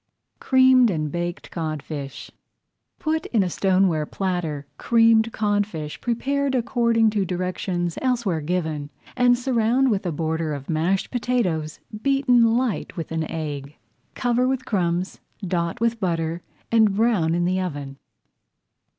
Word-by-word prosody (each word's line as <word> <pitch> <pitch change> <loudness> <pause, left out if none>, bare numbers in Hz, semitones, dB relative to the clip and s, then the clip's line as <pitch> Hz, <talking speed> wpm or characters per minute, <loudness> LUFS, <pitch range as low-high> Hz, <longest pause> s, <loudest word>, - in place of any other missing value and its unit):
CREAMED 260 -2 +5
AND 155 -5 -2
BAKED 175 0 -4
CODFISH 150 -4 -5 0.7
Put 315 0 -1
into 215 -5 +2
a - - -1
stoneware 185 -6 +2
platter 175 -7 -2
creamed 230 -1 +4
codfish 205 -8 -2
prepared 270 +3 0
according 235 -2 +2
to 210 -2 0
directions 180 -1 -2
elsewhere 235 -11 0
given, 155 -3 -2 0.3
and 245 -1 +4
surround 245 +1 +2
with 195 -3 -1
a - - 0
border 160 0 -2
of 140 +3 -6
mashed 170 +5 0
potatoes 200 -11 -1 0.2
beaten 250 -4 +3
light 245 -7 -2
with 165 - -5
an 160 -1 -2
egg. 145 -2 -5 0.4
Cover 245 0 +1
with 260 0 -1
crumbs, 180 -4 -1 0.3
dot 170 -2 -1
with 230 0 0
butter, 165 -2 -1 0.3
and 220 -3 +4
brown 200 -7 +2
in 175 0 +1
the 185 +1 +1
oven. 145 -6 -5
185 Hz, 130 wpm, -23 LUFS, 160-235 Hz, 0.7 s, CREAMED